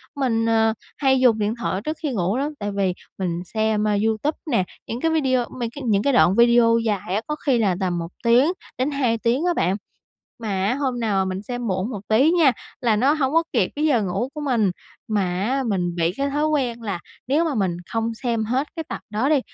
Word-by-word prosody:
mình, 230 -5 +1
ờ, 225 -1 +3 0.2
hay 265 -2 +3
dùng 240 -4 +4
điện 210 +1 0
thoại 195 -3 -2
trước 310 +6 -4
khi 295 - 0
ngủ 195 +2 0
lắm, 290 +3 -1
tại 205 0 -3
vì 195 -2 0 0.2
mình 175 -2 -2
xem, 215 +1 0
a, 210 - +2
YouTube 225 +8 0
nè, 210 -6 +3 0.2
những 235 +2 -4
cái 325 - +2
video 260 -6 +2
mấy 235 - -1
cái 285 - -6
những 205 -2 +2
cái 280 - +2
đoạn 195 -6 +5
video 235 0 +5
dài 205 -5 -1
á, 215 - 0
có 300 - -1
khi 255 -4 +3
là 195 -5 +2
tầm 180 -2 -1
1 170 0 -5
tiếng 245 +8 +5 0.3
đến 260 +4 0
2 250 -5 +1
tiếng 245 +9 0
á 350 - +2
bạn. 190 - +1 0.6
Mà 200 -5 -2
á 230 - +1
hôm 260 -3 -2
nào 200 -4 +1
mà 190 - -3
mình 185 +2 -4
xem 245 +2 -4
muộn 190 +3 -1
một 210 - -5
tí 255 +8 +4
nha, 330 -6 +5 0.3
là 230 -4 +2
nó 265 +7 +3
hổng 280 -3 0
có 330 - +5
kịp - - +2
cái 300 - 0
giờ 255 -8 +3
ngủ 200 +6 -2
của 300 - -5
mình. 235 -9 +1 0.4
Mà 210 -2 +1 0.2
á 265 +4 0
mình 180 -5 -1
bị 170 0 +1
cái 280 0 -1
thói 295 +2 +1
quen 250 -6 -1
là 200 -5 -3 0.3
nếu 295 +6 +2
mà 315 -4 -1
mình 190 -5 0 0.2
không 225 0 -1
xem 230 -2 -1
hết 255 +6 -1
cái 325 - -3
tập - - -5
đó 220 +6 0
đi 295 -3 +4
230 Hz, 240 wpm, -22 LUFS, 205-270 Hz, 0.6 s, đoạn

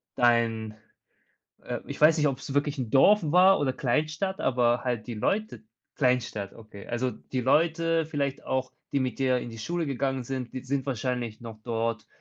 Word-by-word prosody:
dein, 115 -2 +2 0.9
äh - - -4
ich - - -7
weiß 155 +2 +7
nicht, 150 -2 +3
ob's 135 +1 -5
wirklich 145 0 0
'n 120 -4 -3
Dorf 205 +10 +6
war 180 +5 +5
oder 130 -2 +1
Kleinstadt, 155 +10 -1
aber 120 -1 +2
halt 120 -3 -2
die 120 - -5
Leute 210 - -1 0.3
Kleinstadt, 125 -7 0
okay. 110 -3 -12
Also, 125 +2 -1
die 130 +1 -5
Leute 165 +4 +2
vielleicht 140 -3 -2
auch, 130 0 -2 0.2
die 140 - +1
mit 130 +1 -2
dir 130 -2 +2
in 120 - -6
die 115 - -9
Schule 170 +7 -2
gegangen 135 -1 -1
sind, 130 -1 -5
die 130 - -4
sind 135 0 -2
wahrscheinlich 125 -3 -3
noch 115 -2 -9
dort 115 -2 -2
130 Hz, 175 wpm, -27 LUFS, 120-150 Hz, 0.9 s, weiß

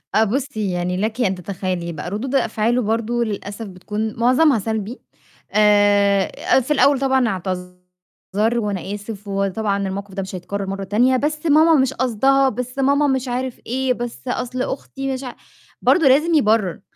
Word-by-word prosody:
آه، 220 - +5
بُصّي 220 -3 -2
يعني 180 +1 -2
لكِ 220 +5 -2
أن 190 -5 +1
تتخيلي 180 -2 -4
بقى، 160 +2 -6
ردود 250 +7 -3
أفعاله 230 0 +1
برضه 230 +2 0
للأسف 205 0 -5
بتكون 210 +4 -4
معظمها 255 +1 +4
سلبي 220 +3 -4 0.5
آآ 205 -1 +4 0.3
في 260 +4 -5
الأول 280 -1 +4
طبعًا 265 -2 +2
اعتذر 180 +3 -4
و 210 -2 -1
"أنا 190 +1 -4
آسف، 205 0 -8
وطبعًا 200 0 -1
الموقف 195 0 -6
ده 195 - -3
مش 190 0 -6
هيتكرر 195 +2 -4
مرة 195 0 -4
تانية، 240 +7 +2
بس 300 +3 -2
ماما 315 +2 +5
مش 265 0 0
قصدها، 265 +3 +2
بس 250 +2 -6
ماما 280 +2 +3
مش 265 -1 0
عارف 250 0 -3
إيه 255 +1 0
بس 240 +1 -7
أصل 250 0 -3
أختي 270 0 -4
مش 260 +1 -5
عا" 250 - -7 0.5
برضه 325 -6 +4
لازم 300 +6 +4
يبرر، 215 - +2
220 Hz, 165 wpm, -20 LUFS, 195-260 Hz, 0.5 s, آه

